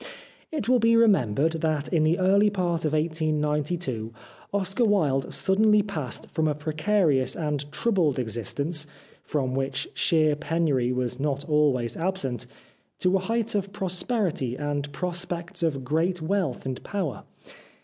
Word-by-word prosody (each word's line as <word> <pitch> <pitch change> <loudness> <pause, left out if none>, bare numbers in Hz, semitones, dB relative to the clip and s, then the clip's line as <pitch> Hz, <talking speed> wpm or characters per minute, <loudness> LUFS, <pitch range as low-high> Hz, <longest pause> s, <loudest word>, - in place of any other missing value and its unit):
It 305 -6 -3
will 250 0 +4
be 230 0 +4
remembered 165 - +3
that 155 -2 0
in 165 -4 +2
the 160 +3 +3
early 200 +2 +4
part 175 -5 -1
of 155 - 0
1892 150 -5 -1 0.4
Oscar 200 +4 0
Wilde 155 - +2
suddenly 210 +2 +3
passed 155 - -5
from 160 -1 +1
a 150 - 0
precarious 155 -2 +1
and 145 -2 -3
troubled 180 - +1
existence, 135 - -2 0.3
from 130 -4 -2
which 135 0 -2
sheer 155 -2 +2
penury 150 -5 0
was 125 0 -2
not 140 0 -2
always 140 -6 +2
absent, 165 - -2 0.5
to 180 +1 +2
a - - +3
height 225 +4 -1
of 200 -1 -1
prosperity 185 - -1
and 145 0 -3
prospects 175 +2 -3
of 145 -5 0
great 165 +7 0
wealth 165 -6 -1
and 130 -1 -4
power. 185 -9 -3
155 Hz, 140 wpm, -26 LUFS, 140-190 Hz, 0.5 s, will